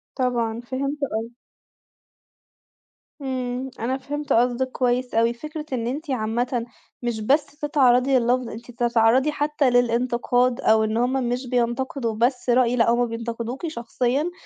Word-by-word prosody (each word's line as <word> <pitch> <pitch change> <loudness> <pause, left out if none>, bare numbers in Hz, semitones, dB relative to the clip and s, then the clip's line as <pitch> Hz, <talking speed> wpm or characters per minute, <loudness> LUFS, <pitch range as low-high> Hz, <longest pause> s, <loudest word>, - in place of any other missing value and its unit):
طبعًا، 235 -3 -1
فهمت 275 +3 -2
قصدِك. 225 +2 -3 1.9
إمم، 255 -1 -3
أنا 255 +4 -1
فهمت 290 +2 -3
قصدِك 245 +2 +2
كويس 250 0 0
أوي، 230 +1 +3
فكرة 305 +4 -7
إن 235 -2 -1
أنتِ 290 +4 -4
عامةً 235 +1 -1 0.4
مش 235 -2 -2
بس 280 +7 +3
تتعرّضي 270 -3 +2
لللفظ، 245 0 +1
أنتِ 235 +2 -9
بتتعرّضي 240 +4 +3
حتى 295 -2 +1
للانتقاد 245 0 +2
أو 220 0 +4
إن 220 +1 -1
هُم 250 +2 +1 0.2
مش 250 +1 -2
بينتقدوا 240 -1 -1
بس 245 +2 0
رأي، 245 0 +4
لأ 230 -1 +3
هُم 240 +1 +2
بينتقدوكِ 235 +5 -4
شخصيًا، 260 +3 -1
245 Hz, 135 wpm, -23 LUFS, 235-265 Hz, 1.9 s, أو